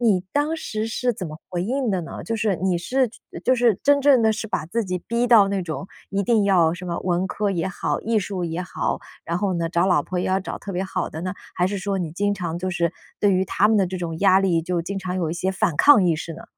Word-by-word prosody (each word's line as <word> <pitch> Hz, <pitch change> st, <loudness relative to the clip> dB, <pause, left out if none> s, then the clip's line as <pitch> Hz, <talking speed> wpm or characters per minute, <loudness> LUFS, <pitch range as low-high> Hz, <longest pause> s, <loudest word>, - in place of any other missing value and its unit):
你 210 Hz, -7 st, +3 dB
当 295 Hz, +3 st, +1 dB
时 215 Hz, -7 st, -3 dB
是 245 Hz, +2 st, 0 dB
怎 205 Hz, -4 st, -6 dB
么 155 Hz, -, -9 dB
回 175 Hz, -1 st, -2 dB
应 255 Hz, +5 st, -1 dB
的 190 Hz, -, 0 dB
呢？ 165 Hz, -, -7 dB
就 225 Hz, -, -2 dB
是 210 Hz, -4 st, 0 dB
你 185 Hz, 0 st, 0 dB
是 255 Hz, +9 st, +1 dB
觉 225 Hz, -, -18 dB, 0.2 s
就 255 Hz, -, +4 dB
是 240 Hz, -5 st, +3 dB
真 285 Hz, 0 st, +4 dB
正 275 Hz, -4 st, +5 dB
地 220 Hz, -, +4 dB
是 220 Hz, 0 st, -5 dB
把 155 Hz, -6 st, -2 dB
自 225 Hz, +6 st, -1 dB
己 185 Hz, -1 st, -2 dB
逼 235 Hz, +1 st, +1 dB
到 215 Hz, -5 st, +7 dB
那 195 Hz, -2 st, -1 dB
种， 175 Hz, +3 st, -5 dB, 0.2 s
一 195 Hz, 0 st, 0 dB
定 225 Hz, -1 st, +3 dB
要 175 Hz, -5 st, +3 dB
什 180 Hz, -, -8 dB
么 170 Hz, -1 st, -3 dB
文 180 Hz, 0 st, +1 dB
科 210 Hz, -1 st, -1 dB
也 185 Hz, -1 st, -1 dB
好、 -, -, -2 dB
艺 225 Hz, -1 st, +1 dB
术 190 Hz, -2 st, -3 dB
也 165 Hz, +1 st, -3 dB
好， 180 Hz, -, -2 dB, 0.3 s
然 170 Hz, +1 st, -2 dB
后 195 Hz, -1 st, 0 dB
呢， 170 Hz, -1 st, -1 dB
找 170 Hz, +2 st, +1 dB
老 175 Hz, -6 st, +3 dB
婆 180 Hz, +3 st, -4 dB
也 -, -, -1 dB
要 190 Hz, +1 st, +1 dB
找 -, -, -6 dB
特 200 Hz, -, -7 dB
别 180 Hz, +1 st, -1 dB
好 185 Hz, -2 st, -2 dB
的 160 Hz, -, -7 dB
呢？ 185 Hz, +1 st, -3 dB, 0.2 s
还 180 Hz, -, +1 dB
是 200 Hz, +1 st, -2 dB
说 195 Hz, +1 st, -2 dB
你 170 Hz, -3 st, -3 dB
经 205 Hz, +5 st, 0 dB
常 170 Hz, -3 st, -4 dB
就 185 Hz, +1 st, -3 dB
是 170 Hz, -1 st, 0 dB, 0.3 s
对 205 Hz, -1 st, +4 dB
于 185 Hz, 0 st, +2 dB
他 205 Hz, +2 st, +2 dB
们 220 Hz, -, +3 dB
的 195 Hz, -3 st, +3 dB
这 185 Hz, +1 st, -4 dB
种 165 Hz, -2 st, -4 dB
压 195 Hz, -1 st, +5 dB
力， 180 Hz, -4 st, +2 dB
就 175 Hz, 0 st, -1 dB
经 195 Hz, +3 st, -4 dB
常 185 Hz, -1 st, -4 dB
有 170 Hz, -4 st, -1 dB
一 -, -, -2 dB
些 185 Hz, +3 st, -1 dB
反 175 Hz, -4 st, 0 dB
抗 285 Hz, -, +7 dB
意 170 Hz, -3 st, +2 dB
识 165 Hz, +1 st, -6 dB
呢？ 165 Hz, -, -10 dB
190 Hz, 300 characters per minute, -23 LUFS, 175-215 Hz, 0.3 s, 到